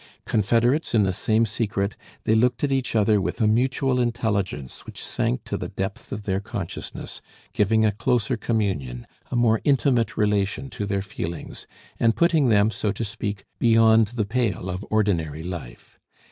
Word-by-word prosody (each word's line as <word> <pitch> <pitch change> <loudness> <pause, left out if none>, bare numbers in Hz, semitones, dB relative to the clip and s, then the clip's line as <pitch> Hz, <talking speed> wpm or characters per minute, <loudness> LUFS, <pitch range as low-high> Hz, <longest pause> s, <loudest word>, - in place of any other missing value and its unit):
Confederates 120 +7 +2
in 105 - +5
the 95 -1 +1
same 110 +4 +2
secret, 105 -2 -1 0.3
they 110 - +2
looked 120 +2 +2
at 140 - +1
each 130 -3 0
other 105 -1 +3
with 110 - -3
a 110 - +3
mutual 130 +3 +2
intelligence 105 - -2
which - - -10
sank 60 - -1
to - - -3
the - - -4
depth 95 +1 -5
of 105 - -4
their 95 -1 0
consciousness, 100 -3 -6 0.3
giving 110 +2 +3
a 105 - +3
closer 120 +4 0
communion, 95 - -2 0.2
a - - -3
more 115 -2 +3
intimate 130 -4 +2
relation 105 +5 0
to 105 -4 -4
their 100 -1 -1
feelings, 85 -4 -6 0.3
and 115 -1 +3
putting 165 -6 +3
them, 105 0 +4
so 105 -2 -1
to 110 +3 -3
speak, 105 -2 -5
beyond 115 -1 +5
the 110 -1 -2
pale 105 -5 -1
of 90 +2 -5
ordinary 85 -8 0
life. 85 -9 -8
110 Hz, 165 wpm, -24 LUFS, 100-120 Hz, 0.3 s, in